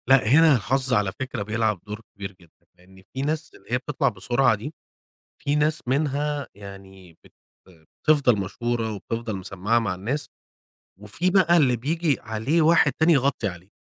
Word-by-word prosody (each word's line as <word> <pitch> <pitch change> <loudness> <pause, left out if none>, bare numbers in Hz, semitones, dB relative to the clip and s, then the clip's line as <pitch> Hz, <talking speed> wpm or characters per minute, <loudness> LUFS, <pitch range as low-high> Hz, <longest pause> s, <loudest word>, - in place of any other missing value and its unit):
لأ، 135 -4 +5
هنا 155 +5 +6
الحظ 130 +4 -1
على 105 -5 +2
فكرة 130 -5 -3
بيلعب 110 -2 -1
دور 105 +1 -6
كبير 100 -1 -7
جدًا، 85 -2 -24
لأن 95 +1 -19
في 135 - -4
ناس 155 +2 -3
اللي - - -15
هي 125 - +3
بتطلع 135 +3 -1
بسرعة 120 +4 +1
دي، 130 +9 -7 0.7
في 145 - 0
ناس 150 -2 0
منها 145 +1 -1
يعني 95 -3 -13
بت - - -21 0.3
بتفضل 115 - +1
مشهورة 115 +3 -2
وبتفضل 110 +2 -4
مسمّعة 95 +4 -1
مع 100 -5 -2
الناس، 130 +11 -3 0.7
وفي 105 - -1
بقى 180 -2 +4
اللي 130 -7 +4
بييجي 150 +4 0
عليه 110 +9 0
واحد 160 -3 +4
تاني 160 +2 +4
يغطي 135 -6 +1
عليه. 90 0 -10
120 Hz, 160 wpm, -24 LUFS, 100-145 Hz, 0.7 s, هنا